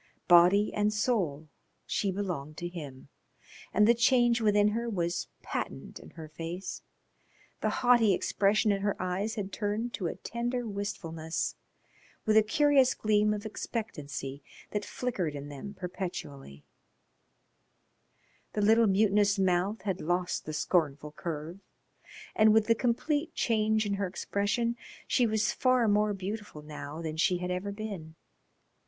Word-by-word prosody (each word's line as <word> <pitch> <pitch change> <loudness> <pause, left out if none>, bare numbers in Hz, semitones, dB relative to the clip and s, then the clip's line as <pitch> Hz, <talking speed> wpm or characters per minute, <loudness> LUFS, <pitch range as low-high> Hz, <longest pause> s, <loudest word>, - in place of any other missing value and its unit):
Body 180 +4 +6
and 210 0 +1
soul 195 - 0 0.4
she 200 - -1
belonged 175 -7 -4
to 175 - -3
him. 145 -7 -9 0.6
And 210 +1 +4
the 235 - +7
change 240 0 +3
within 210 -1 +4
her 235 +2 -2
was 175 -4 -1 0.2
patent - - -5
in - - -13
her 160 -1 -7
face, 165 +4 -6 0.8
the - - +1
haughty 240 -4 +4
expression 205 +3 +2
in 200 -1 0
her 205 0 -1
eyes 185 +5 -2
had 200 -3 -4
turned 215 +3 -2
to 185 - -2
a - - -4
tender 240 +1 -3
wistfulness, 165 -6 -3 0.7
with 215 - +3
a 220 - +8
curious 270 +4 +3
gleam 210 0 +2
of 210 0 -3
expectancy 145 - -5 0.3
that 210 -1 -2
flickered 195 -11 -3
in 145 0 -7
them 175 +9 -8
perpetually; 175 - -6 1.9
the 210 - -1
little 225 +2 +5
mutinous 200 0 +3
mouth 190 +2 +1
had 195 -3 -2
lost 175 +2 -1
the 155 - -5
scornful 150 -2 0
curve. 160 +3 -6 0.8
And 215 0 +5
with 220 -1 +4
the 230 - +4
complete 290 +7 -1
change 220 -1 +1
in 205 - -1
her 200 -1 -1
expression 205 +5 -1 0.3
she 245 - +3
was 220 0 +1
far 255 -3 +3
more 210 0 +2
beautiful 195 -4 -6
now 150 +1 -7
than 160 -1 -4
she 180 +2 +3
had 180 +1 -3
ever 185 +3 -2
been. 200 -7 -7
200 Hz, 140 wpm, -30 LUFS, 175-220 Hz, 1.9 s, a